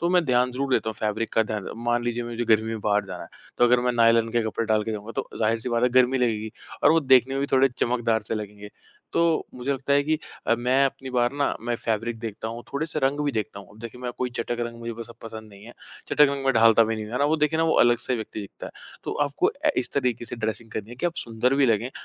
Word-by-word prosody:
तो 170 Hz, -, +1 dB
मैं 180 Hz, -2 st, +3 dB
ध्यान 125 Hz, -1 st, +2 dB
ज़रूर 135 Hz, +1 st, -2 dB
देता 110 Hz, -, 0 dB
हूँ 110 Hz, -, -3 dB
फैब्रिक 110 Hz, +1 st, -1 dB
का 110 Hz, -, +3 dB
ध्यान 105 Hz, -3 st, -4 dB
मान 120 Hz, +1 st, 0 dB
लीजिए 120 Hz, 0 st, -2 dB
मुझे 120 Hz, 0 st, -3 dB
गर्मी 110 Hz, 0 st, +3 dB
में 110 Hz, -1 st, -4 dB
बाहर 105 Hz, 0 st, +1 dB
जाना -, -, -7 dB
है, -, -, -11 dB, 0.3 s
तो 120 Hz, -, +6 dB
अगर 120 Hz, 0 st, +4 dB
मैं 125 Hz, 0 st, +1 dB
नायलॉन 115 Hz, -1 st, +4 dB
के 120 Hz, -1 st, +2 dB
कपड़े 110 Hz, +1 st, -2 dB
डाल 110 Hz, -1 st, +2 dB
के 110 Hz, -, -3 dB
जाऊँगा, 105 Hz, +2 st, -6 dB
तो -, -, -2 dB
ज़ाहिर-सी 115 Hz, +2 st, 0 dB
बात 120 Hz, 0 st, 0 dB
है 125 Hz, -, +5 dB
गर्मी 130 Hz, +1 st, +2 dB
लगेगी 110 Hz, -3 st, 0 dB, 0.3 s
और -, -, +6 dB
वो 165 Hz, -, +4 dB
देखने 130 Hz, -2 st, +4 dB
में 135 Hz, -, -1 dB
भी 140 Hz, -, 0 dB
थोड़े 135 Hz, +1 st, +5 dB
चमकदार 120 Hz, -2 st, +1 dB
से -, -, -3 dB
लगेंगे। 105 Hz, -1 st, -7 dB, 0.4 s
तो -, -, +1 dB, 0.3 s
मुझे 125 Hz, +3 st, -2 dB
लगता 140 Hz, +1 st, -2 dB
है 140 Hz, 0 st, +4 dB
कि 155 Hz, 0 st, +1 dB, 0.3 s
अ, -, -, +4 dB
मैं 125 Hz, +3 st, +2 dB
अपनी 135 Hz, -1 st, -3 dB
बार 120 Hz, 0 st, +1 dB
ना 145 Hz, 0 st, 0 dB
मैं 120 Hz, +1 st, -2 dB
फैब्रिक 115 Hz, +1 st, -1 dB
देखता 110 Hz, -1 st, -5 dB
हूँ, 120 Hz, +1 st, -7 dB
थोड़े-से 155 Hz, +2 st, -2 dB
रंग 140 Hz, +2 st, +1 dB
भी 145 Hz, -, 0 dB
देखता 105 Hz, -2 st, -3 dB
हूँ। -, -, -15 dB
अब 105 Hz, -, -17 dB
देखिए, 115 Hz, +1 st, -9 dB
मैं 125 Hz, -1 st, -4 dB
कोई 125 Hz, -1 st, -1 dB
चटक 120 Hz, +1 st, -2 dB
रंग 115 Hz, 0 st, -9 dB
मुझे 115 Hz, 0 st, -4 dB
बस 115 Hz, +1 st, -8 dB
अब -, -, -12 dB
पसंद 110 Hz, -1 st, -8 dB
नहीं 100 Hz, +1 st, -14 dB
है, 120 Hz, -, -11 dB, 0.4 s
चटक -, -, -3 dB
रंग 140 Hz, -1 st, -4 dB
में 135 Hz, -, +3 dB
ढालता 115 Hz, 0 st, +6 dB
भी 115 Hz, +1 st, -1 dB
नहीं 110 Hz, -1 st, -5 dB
हूँ, 110 Hz, -, -10 dB
है 125 Hz, -, -1 dB
ना? 140 Hz, -, +2 dB
वो 155 Hz, +2 st, +2 dB
देखें 150 Hz, +1 st, +1 dB
ना -, -, +3 dB
वो 160 Hz, -, +2 dB
अलग 120 Hz, 0 st, +3 dB
से 125 Hz, -, -1 dB
व्यक्ति 110 Hz, -1 st, -6 dB
दिखता 100 Hz, -, -9 dB
है। -, -, -10 dB, 0.3 s
तो -, -, -3 dB, 0.2 s
आपको 140 Hz, -, +1 dB, 0.2 s
ए -, -, +6 dB
इस -, -, -1 dB
तरीके 125 Hz, -4 st, 0 dB
से 120 Hz, +2 st, -7 dB
ड्रेसिंग 110 Hz, 0 st, -4 dB
करनी 110 Hz, +1 st, -6 dB
है 120 Hz, -, -9 dB
कि 175 Hz, -, -1 dB
आप 170 Hz, -, -3 dB
सुंदर 120 Hz, +3 st, 0 dB
भी 140 Hz, -1 st, +4 dB
लगें 115 Hz, +2 st, +1 dB
120 Hz, 285 wpm, -25 LUFS, 110-130 Hz, 0.4 s, तो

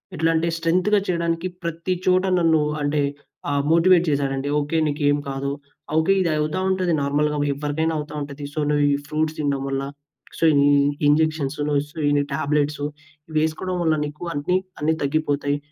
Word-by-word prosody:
ఎట్లంటే 165 Hz, +1 st, +1 dB
స్ట్రెంగ్త్‌గా 185 Hz, +5 st, +2 dB
చేయడానికి 170 Hz, 0 st, -1 dB, 0.2 s
ప్రతి 170 Hz, +2 st, -2 dB
చోట 185 Hz, 0 st, +4 dB, 0.2 s
నన్ను 160 Hz, -2 st, +3 dB, 0.2 s
అంటే 145 Hz, 0 st, +1 dB, 0.5 s
ఆ -, -, 0 dB, 0.2 s
మోటివేట్ 170 Hz, +1 st, +5 dB
చేసాడండి. 140 Hz, -1 st, -1 dB
ఓకే. 145 Hz, +3 st, -1 dB
నీకేం 145 Hz, 0 st, +1 dB
కాదు. 135 Hz, +1 st, -3 dB, 0.5 s
ఓకే. 160 Hz, +5 st, +4 dB
ఇది 170 Hz, -, +1 dB
అవుతా 155 Hz, +5 st, -1 dB
ఉంటది. 185 Hz, -2 st, +1 dB
నార్మల్‌గా 150 Hz, +1 st, 0 dB, 0.2 s
ఎవ్వరికైనా 150 Hz, +3 st, -1 dB
అవుతా 150 Hz, 0 st, -7 dB
ఉంటది. 145 Hz, 0 st, -7 dB
సో, 155 Hz, -, -3 dB
నువ్వు 145 Hz, 0 st, +2 dB
ఈ -, -, +3 dB
ఫ్రూట్స్ 155 Hz, +1 st, -1 dB
తినడం 140 Hz, -2 st, -1 dB
వల్ల. 135 Hz, 0 st, -2 dB, 0.6 s
సో, -, -, -2 dB, 0.2 s
ఈ -, -, +5 dB, 0.4 s
ఇంజెక్షన్సు‌ను 150 Hz, -1 st, +1 dB
స్ 150 Hz, -, -20 dB
ఈ -, -, +3 dB, 0.2 s
టాబ్లెట్సు 145 Hz, 0 st, 0 dB, 0.5 s
వేసుకోవడం 160 Hz, +4 st, -1 dB
వల్ల 160 Hz, -1 st, +3 dB
నీకు 150 Hz, +3 st, -8 dB
అన్ని 150 Hz, +6 st, 0 dB, 0.2 s
అన్ని 160 Hz, +1 st, +2 dB
తగ్గిపోతాయి. 145 Hz, -1 st, 0 dB
155 Hz, 150 wpm, -22 LUFS, 145-165 Hz, 0.6 s, మోటివేట్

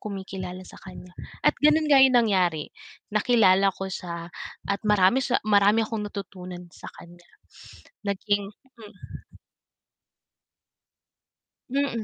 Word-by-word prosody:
kumikilala 190 Hz, -2 st, -7 dB
sa -, -, -14 dB
kaniya, 180 Hz, -1 st, -12 dB, 0.3 s
at -, -, +5 dB
gano'n 305 Hz, +1 st, +4 dB
nga 275 Hz, -2 st, +7 dB
'yon 260 Hz, -1 st, +5 dB
nangyari, 185 Hz, -9 st, +2 dB, 0.5 s
nakilala 205 Hz, -3 st, +4 dB
ko 195 Hz, -, -6 dB
siya 170 Hz, -1 st, -6 dB, 0.4 s
at 200 Hz, 0 st, -1 dB
marami 210 Hz, +4 st, +4 dB
sa 250 Hz, -, +1 dB
marami 210 Hz, +1 st, +4 dB
akong 215 Hz, -1 st, -4 dB
natutunan 180 Hz, -3 st, -8 dB
sa -, -, -11 dB
kaniya. 175 Hz, 0 st, -15 dB, 0.8 s
Naging 200 Hz, 0 st, -1 dB, 0.3 s
hmm 210 Hz, -3 st, -14 dB, 2.6 s
Mm. 270 Hz, -4 st, -1 dB
200 Hz, 110 wpm, -25 LUFS, 185-225 Hz, 2.6 s, nga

